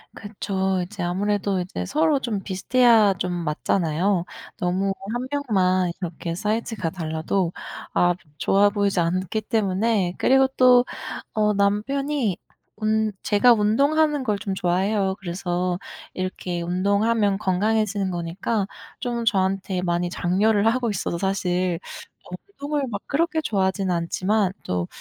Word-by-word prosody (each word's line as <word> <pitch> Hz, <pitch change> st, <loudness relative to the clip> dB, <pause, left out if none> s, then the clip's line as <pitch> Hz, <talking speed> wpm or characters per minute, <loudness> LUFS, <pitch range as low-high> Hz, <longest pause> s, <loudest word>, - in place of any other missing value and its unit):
그쵸. 190 Hz, -2 st, -2 dB
이제 190 Hz, +1 st, -6 dB
아무래도 195 Hz, +2 st, 0 dB
이제 180 Hz, +1 st, -4 dB
서로 305 Hz, -1 st, +2 dB
좀 230 Hz, -6 st, -2 dB
비슷해야 220 Hz, +2 st, +4 dB
좀 180 Hz, -, -1 dB
맞잖아요. 170 Hz, +2 st, 0 dB, 0.3 s
너무 185 Hz, +2 st, 0 dB, 0.2 s
1 245 Hz, +1 st, -3 dB
명만 190 Hz, -10 st, +1 dB
이렇게 170 Hz, -1 st, -4 dB
사이즈가 215 Hz, -1 st, -2 dB
달라도 165 Hz, +2 st, -2 dB, 0.4 s
아 175 Hz, 0 st, +3 dB, 0.2 s
좋아 200 Hz, +1 st, +4 dB
보이지 200 Hz, -2 st, +1 dB
않기 185 Hz, +5 st, 0 dB
때문에 205 Hz, -3 st, 0 dB
그리고 265 Hz, 0 st, +4 dB
또 250 Hz, -1 st, +7 dB, 0.5 s
어 210 Hz, -1 st, +2 dB
남편이 220 Hz, +3 st, 0 dB, 0.4 s
운 215 Hz, 0 st, +1 dB
제가 225 Hz, +4 st, +5 dB
운동하는 280 Hz, +7 st, +2 dB
걸 210 Hz, -5 st, -1 dB
좀 195 Hz, -1 st, -3 dB
좋아해요. 190 Hz, +2 st, +1 dB
그래서 180 Hz, 0 st, -2 dB, 0.3 s
이렇게 185 Hz, -1 st, -3 dB
운동하면 200 Hz, +3 st, +1 dB
건강해지는 205 Hz, 0 st, 0 dB
거니까 180 Hz, +5 st, -2 dB, 0.3 s
좀 240 Hz, -2 st, -2 dB
저한테 190 Hz, -3 st, 0 dB
많이 175 Hz, 0 st, 0 dB
장려를 200 Hz, +4 st, +1 dB
하고 240 Hz, +1 st, +1 dB
있어서 175 Hz, -4 st, -2 dB
사실 185 Hz, -2 st, 0 dB, 0.5 s
어 -, -, -3 dB, 0.3 s
운동을 290 Hz, 0 st, -1 dB
막 200 Hz, -3 st, -4 dB
그렇게 325 Hz, +2 st, +1 dB
좋아하진 195 Hz, -6 st, 0 dB
않지만 185 Hz, +3 st, 0 dB
또 90 Hz, -1 st, -2 dB
200 Hz, 285 characters per minute, -23 LUFS, 180-220 Hz, 0.5 s, 또